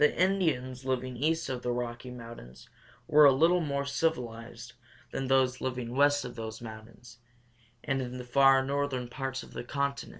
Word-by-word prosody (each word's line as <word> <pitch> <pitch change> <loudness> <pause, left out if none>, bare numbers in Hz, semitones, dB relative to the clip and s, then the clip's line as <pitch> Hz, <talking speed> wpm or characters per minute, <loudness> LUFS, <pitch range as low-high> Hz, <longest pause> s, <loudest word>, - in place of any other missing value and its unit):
The 150 - +4
Indians 155 -10 +1
living 130 -1 -2
east 160 +6 0
of 125 -2 -3
the 125 - -1
Rocky 120 0 -4
Mountains 115 - -11 0.4
were 150 0 +7
a 140 - +9
little 165 +6 +4
more 140 -3 -1
civilized 120 -5 -3 0.4
than 135 -1 -3
those 130 -1 +2
living 125 -2 -3
west 145 +1 +3
of 125 - -7
those 110 -1 -6
mountains 110 +1 -11 0.6
and 135 -2 0
in 125 0 -5
the 125 - -6
far 135 +1 +5
northern 140 -2 -1
parts 130 +1 -4
of - - -14
the - - -5
continent. 140 +2 -2
130 Hz, 170 wpm, -30 LUFS, 120-140 Hz, 0.6 s, a